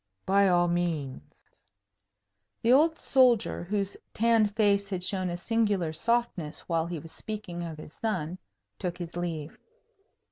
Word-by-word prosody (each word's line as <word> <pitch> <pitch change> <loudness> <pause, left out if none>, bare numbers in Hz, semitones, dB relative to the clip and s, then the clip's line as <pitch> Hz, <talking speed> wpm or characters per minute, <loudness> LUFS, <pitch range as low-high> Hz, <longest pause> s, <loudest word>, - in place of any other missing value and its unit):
"By 200 +1 +4
all 175 -1 +4
means." 170 -6 -1 1.4
The 235 +2 +5
old 320 +4 +4
soldier, 245 -8 +3
whose 200 +1 -1 0.2
tanned 220 -2 +3
face 200 -2 +3
had 185 -3 -3
shown 185 -1 0
a 175 - -3
singular 205 -5 0
softness 225 -6 -1
while 165 -1 -1
he 170 -1 -4
was 160 +1 -10
speaking 205 -5 -6
of 165 -2 -5
his 150 - -11
son, 185 -5 -2 0.4
took 180 -2 -3
his 170 -1 -7
leave. 165 -3 -4
185 Hz, 140 wpm, -28 LUFS, 170-215 Hz, 1.4 s, The